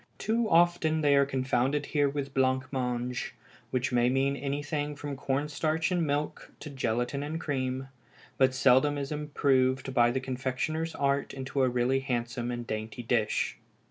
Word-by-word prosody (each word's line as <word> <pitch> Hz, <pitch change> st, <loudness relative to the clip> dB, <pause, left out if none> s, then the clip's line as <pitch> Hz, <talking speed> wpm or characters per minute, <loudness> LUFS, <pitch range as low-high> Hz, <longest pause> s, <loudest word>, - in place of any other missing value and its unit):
Too 225 Hz, 0 st, 0 dB
often 165 Hz, -2 st, +3 dB
they 145 Hz, -2 st, +4 dB
are 140 Hz, 0 st, +4 dB
confounded 135 Hz, +2 st, 0 dB
here 145 Hz, -1 st, +1 dB
with 140 Hz, -1 st, -4 dB
blanc 130 Hz, 0 st, +2 dB
mange, 125 Hz, -1 st, -2 dB, 0.3 s
which 130 Hz, +1 st, -1 dB
may 120 Hz, 0 st, +3 dB
mean 135 Hz, +2 st, +1 dB
anything 145 Hz, +1 st, -3 dB
from 145 Hz, 0 st, -5 dB
corn 135 Hz, +2 st, -1 dB
starch 155 Hz, +3 st, 0 dB
and 175 Hz, -3 st, +1 dB
milk 145 Hz, +1 st, -2 dB
to 150 Hz, -, -7 dB
gelatine 120 Hz, +1 st, -1 dB
and 155 Hz, +3 st, -3 dB
cream, 130 Hz, -3 st, -2 dB, 0.5 s
but 130 Hz, -1 st, +4 dB
seldom 135 Hz, +3 st, +4 dB
is 140 Hz, 0 st, -4 dB
improved 135 Hz, -3 st, +1 dB
by 120 Hz, -1 st, +5 dB
the 130 Hz, +2 st, 0 dB
confectioner's 135 Hz, +5 st, -2 dB
art 140 Hz, 0 st, 0 dB
into 135 Hz, +1 st, -2 dB
a 130 Hz, -, +4 dB
really 125 Hz, +2 st, +1 dB
handsome 120 Hz, -2 st, -2 dB
and 120 Hz, -1 st, -4 dB
dainty 110 Hz, +2 st, -5 dB
dish. 115 Hz, -2 st, 0 dB
135 Hz, 160 wpm, -29 LUFS, 130-145 Hz, 0.5 s, by